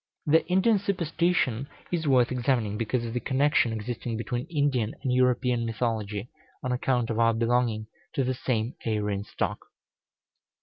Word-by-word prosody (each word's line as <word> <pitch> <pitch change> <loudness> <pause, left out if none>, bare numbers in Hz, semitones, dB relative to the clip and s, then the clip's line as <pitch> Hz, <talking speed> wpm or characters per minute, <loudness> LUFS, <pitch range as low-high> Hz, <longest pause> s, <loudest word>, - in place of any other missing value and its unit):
The 160 +2 +4
Indian 190 +4 +3
superstition 170 - 0 0.2
is 165 -3 -1
worth 130 -3 +4
examining, 120 -4 0
because 115 +2 -1
of 115 - -4
the 125 - 0
connection 135 -1 +2
existing 115 +1 -4
between 120 +2 -3
Indian 140 -8 0
and 130 -3 +1
European 125 -1 +2
mythology, 110 -2 -2 0.4
on 130 - -1
account 125 -2 0
of 115 - -1
our 115 -1 +4
belonging 115 -1 +1 0.3
to 135 - +2
the 130 +1 0
same 120 -2 -1
Aryan 105 -3 -1
stock. - - -2
125 Hz, 145 wpm, -27 LUFS, 115-135 Hz, 0.4 s, The